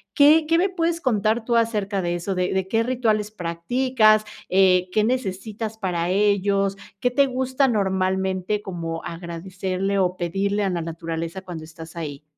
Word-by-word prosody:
¿Qué 305 +2 +6
qué 330 +1 +3
me 380 +3 +2
puedes 335 -2 -1
contar 220 -2 +1
tú 235 -1 +2
acerca 210 -4 0
de 175 0 -1
eso, 180 +3 -3
de 180 0 -1
de 190 0 0
qué 225 +2 +2
rituales 225 -4 0
practicas, 215 +5 +2 0.3
eh, 185 -1 +4
qué 215 +1 +2
necesitas 220 -2 -2
para 175 -4 -1
ellos, 200 0 +2 0.2
qué 250 - +1
te 280 +2 +4
gusta 260 +1 +1
normalmente 190 -1 0
como 165 -3 -5
agradecerle 185 +3 -3
o 180 -1 +1
pedirle 200 +4 -1
a 195 - +1
la 170 -1 -2
naturaleza 165 +2 -5
cuando 170 -4 -7
estás 160 +1 -11
ahí? 150 -3 -6
195 Hz, 160 wpm, -23 LUFS, 180-225 Hz, 0.3 s, Qué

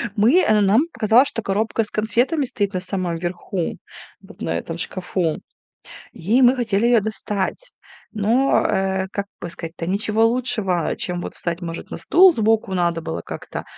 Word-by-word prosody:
Мы, 235 - +4
э, 215 -8 +3
нам 205 +7 +4
показалось, 235 +3 +4
что 255 -5 -3
коробка 220 +3 0
с 210 - -12
конфетами 245 +8 0
стоит 205 -6 -2
на 185 - -1
самом 180 -2 -3
верху, 175 +1 -4 0.4
вот - - -16
на 80 0 -1
этом 165 - -6
шкафу, 175 -2 -2 0.7
и 220 +10 +1
мы 250 +1 +5
хотели 225 -2 +1
её 240 -2 +4
достать. 210 - -4 0.4
Но, 230 +6 +2
э, 190 0 0
как 200 -1 -3
бы 175 - -6
сказать-то, 165 0 -7
ничего 210 +4 +2
лучшего, 225 -8 +1
чем 175 -1 -3
вот - - -7
встать, 170 0 -4
может, 165 0 -6
на - - -5
стул 370 +2 +6
сбоку 220 -3 +1
надо 170 -2 0
было 85 - -5
как-то, - - -7
205 Hz, 165 wpm, -21 LUFS, 180-230 Hz, 0.7 s, стул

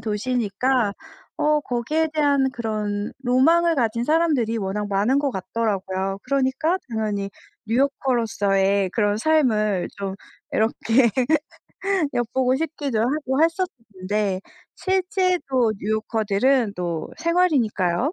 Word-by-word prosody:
도시니까 230 +1 0 0.4
어 300 0 +2
거기에 290 +5 -1
대한 285 -3 +2
그런 215 -4 -3
로망을 325 +7 +4
가진 235 -3 0
사람들이 300 -8 +2
워낙 205 0 -2
많은 205 +7 +2
것 285 -1 0
같더라고요. 195 -2 -2
그러니까 275 +6 0
당연히 210 -3 -2 0.4
뉴욕커로서의 215 -6 +1
그런 205 0 +1
삶을 220 - +2
좀 195 -1 -4 0.4
이렇게 230 +2 +2 1.0
엿보고 250 +2 +1
싶기도 285 -6 -2
하고 265 +3 0
했었을 335 +3 +2 0.3
텐데 190 0 -1 0.3
실제로 365 - +1
뉴요커들은 220 +3 +1
또 170 -3 -3
생활이니까요, 285 - +1
235 Hz, 265 characters per minute, -23 LUFS, 205-280 Hz, 1.0 s, 로망을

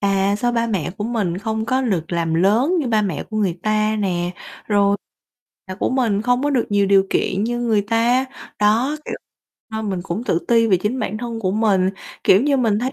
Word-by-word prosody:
à, 195 0 +1
sao 240 +2 0
ba 235 -1 +1
mẹ 185 -8 -2
của 205 - -2
mình 210 -7 -1
không 220 +2 -2
có 255 +3 +1
lược 185 -10 -2
làm 165 -1 0
lớn 225 - +3
như 285 - -2
ba 220 -2 +2
mẹ 190 -7 -2
của 215 - -4
người 190 -5 0
ta 215 0 +1
nè, 175 -3 -1 0.4
rồi 200 -1 +3 0.7
là 185 - -6
của 195 - -1
mình 230 -6 +1
không 245 +2 +1
có 290 - +1
được 255 -5 +1
nhiều 200 -1 +2
điều 195 0 +4
kiện 195 +2 0
như 240 +1 -2
người 220 -4 +1
ta, 235 +4 +2 0.3
đó, 225 +8 +2
kiểu, - - -4 0.6
nên 220 -2 -3
mình 185 - -2
cũng 195 +6 -4
tự 190 -8 +1
ti 230 -1 +4
về 195 -4 +4
chính 210 +8 -2
bản 215 0 -3
thân 230 -1 -5
của 185 - 0
mình, 195 -3 +2 0.3
kiểu 195 +6 +5
như, 285 -1 +2
mình 225 -5 +1
thấy, 255 +4 -2
215 Hz, 225 wpm, -20 LUFS, 195-235 Hz, 0.7 s, kiểu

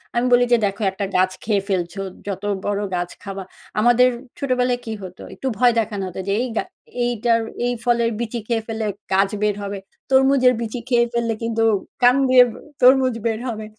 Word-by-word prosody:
আমি 240 +1 +2
বলি 245 0 +5
যে, 240 - +6
"দেখো 200 +2 -3
একটা 200 +1 -3
গাছ 185 0 +3
খেয়ে 205 -3 0
ফেলছো, 185 0 -2 0.3
যত 195 0 -4 0.2
বড় 205 0 -1
গাছ 175 0 -2
খাবা" 195 -1 -6 0.4
আমাদের 240 +2 +5 0.3
ছোটবেলায় 250 -2 0
কি 225 - -4
হতো? 185 0 -10
একটু 265 - -5
ভয় 245 0 +4
দেখানো 205 -3 -2
হতো 185 - -7
যে 200 - +1
এই 255 - -1
গা - - +1 0.4
এইটার 235 -1 +1 0.3
এই 245 - +1
ফলের 235 -1 +2
বিচি 235 0 -3
খেয়ে 230 -2 0
ফেললে 220 -1 -3 0.3
গাছ 195 +1 +3
বের 210 -1 +1
হবে। 200 0 -4 0.3
তরমুজের 265 -1 +5
বিচি 230 +2 -4
খেয়ে 235 -1 +4
ফেললে 230 -1 0
কিন্তু 225 0 0 0.4
কান 245 +1 +6
দিয়ে 255 -1 +8 0.4
তরমুজ 255 0 +5
বের 225 -1 0
হবে। 220 -2 -4
230 Hz, 185 wpm, -21 LUFS, 200-245 Hz, 0.4 s, দিয়ে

